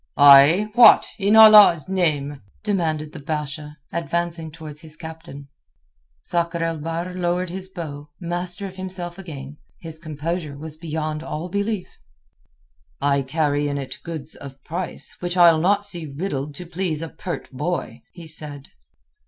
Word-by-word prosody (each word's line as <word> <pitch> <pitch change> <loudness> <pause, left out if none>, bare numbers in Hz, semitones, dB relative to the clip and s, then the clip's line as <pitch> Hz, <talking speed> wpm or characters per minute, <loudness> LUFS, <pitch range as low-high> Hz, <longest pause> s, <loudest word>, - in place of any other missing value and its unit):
"Ay, 145 +9 +7
what, 235 -1 +8
in 200 +2 +3
Allah's 210 -8 +8
name?" 150 -7 -1 0.2
demanded 160 -7 -1
the 155 - -9
Basha, 150 0 -5 0.2
advancing 170 -1 -2
towards 155 -1 -10
his 155 -1 -8
captain. 160 -3 -10 0.7
Sakr 170 - 0
el 165 -1 -2
Bahr 165 +3 -4
lowered 180 0 -1
his 190 +1 -6
bow, 150 -5 -7
master 175 +2 -3
of 190 -1 -8
himself 185 -1 -6
again. 145 -6 -9 0.2
His 160 -1 -9
composure 155 -1 -4
was 155 +1 -7
beyond 155 -1 -4
all 160 +2 -5
belief. 200 +1 -3 1.0
"I 140 0 +2
carry 145 +1 0
in 145 0 -2
it 135 -2 -6
goods 160 -3 -5
of 135 -1 -8
price, 175 +2 -2
which 175 0 -3
I'll 170 -2 +6
not 205 +3 +2
see 175 -6 -4
riddled 145 -1 -4
to 180 - -7
please 170 -2 -3
a 165 - -5
pert 170 -4 -6
boy," 150 +7 -3
he 170 -2 -12
said. 150 -3 -8
165 Hz, 145 wpm, -22 LUFS, 150-180 Hz, 1.0 s, what